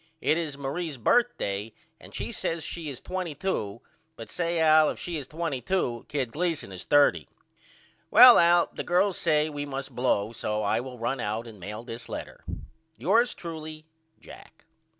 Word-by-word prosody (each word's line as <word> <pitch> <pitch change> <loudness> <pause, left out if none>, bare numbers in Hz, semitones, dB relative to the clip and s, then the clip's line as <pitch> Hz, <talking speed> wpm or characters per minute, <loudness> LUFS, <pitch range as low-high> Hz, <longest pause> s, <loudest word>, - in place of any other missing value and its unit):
It 155 - +2
is 160 -4 -3
Marie's 145 +2 -4
berthday 115 - 0 0.3
and - - -13
she - - -4
says 165 -1 -3
she 165 -1 -5
is 135 - -7
22 170 - -4 0.3
but - - -10
say 170 -1 -1
Al 155 -1 +6
if - - -4
she 175 - -5
is 140 -4 -6
22 150 -4 -2
Kid 135 -5 -2
Gleason 165 - -2
is 95 -1 -7
30. 140 - +4 0.8
Well - - +9
Al 170 0 +5
the - - -4
girls 185 +2 +2
says 155 -2 +2
we 145 0 -5
must 135 -1 -5
blow 115 -4 +1
so 105 -2 -2
I 100 - +1
will 125 0 -7
run 120 +3 -2
out 110 +1 -3
and 110 -3 -12
mail 105 +5 -7
this 120 -1 -8
letter. - - -7 0.5
Yours 230 +6 +2
truly, 155 -2 -8 0.3
JACK. 160 - -15
145 Hz, 165 wpm, -27 LUFS, 120-170 Hz, 0.8 s, Well